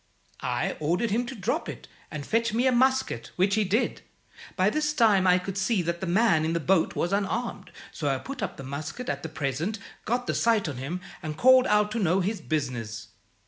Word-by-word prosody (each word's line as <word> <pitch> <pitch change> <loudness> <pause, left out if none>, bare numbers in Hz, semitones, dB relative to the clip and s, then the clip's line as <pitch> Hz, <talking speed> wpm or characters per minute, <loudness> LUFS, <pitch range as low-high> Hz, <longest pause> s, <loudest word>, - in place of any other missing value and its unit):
I - - -1
ordered 175 +9 0
him 240 +3 0
to 265 - -6
drop 195 -6 -2
it, - - -8 0.2
and 150 -2 -6
fetch 230 0 0
me 245 +3 +2
a 260 - +5
musket, 260 - +1
which 190 +2 +2
he 215 +1 +3
did. 205 +5 0 0.5
By 190 +2 +3
this 300 +2 0
time 210 -8 +4
I 180 0 +6
could 190 +1 -4
see 195 -1 +1
that 170 +1 -3
the 190 - -2
man 180 -3 +3
in 160 +1 0
the 170 - +1
boat 170 +1 +2
was 175 +3 -1
unarmed, 210 +4 -2 0.2
so 150 - -4
I 135 - +1
put 270 - -7
up - - -3
the 135 - -8
musket 145 - -5
at - - -2
the 160 - -5
'present,' 155 - -2 0.3
got 245 +2 0
the - - -1
sight 225 -5 +2
on 140 -5 -4
him, 155 +8 -4 0.2
and 155 -3 -5
called 260 0 +6
out 210 0 +3
to 230 - -2
know 185 -1 +2
his 205 +4 -2
business. 125 -7 -3
195 Hz, 220 wpm, -27 LUFS, 160-230 Hz, 0.5 s, I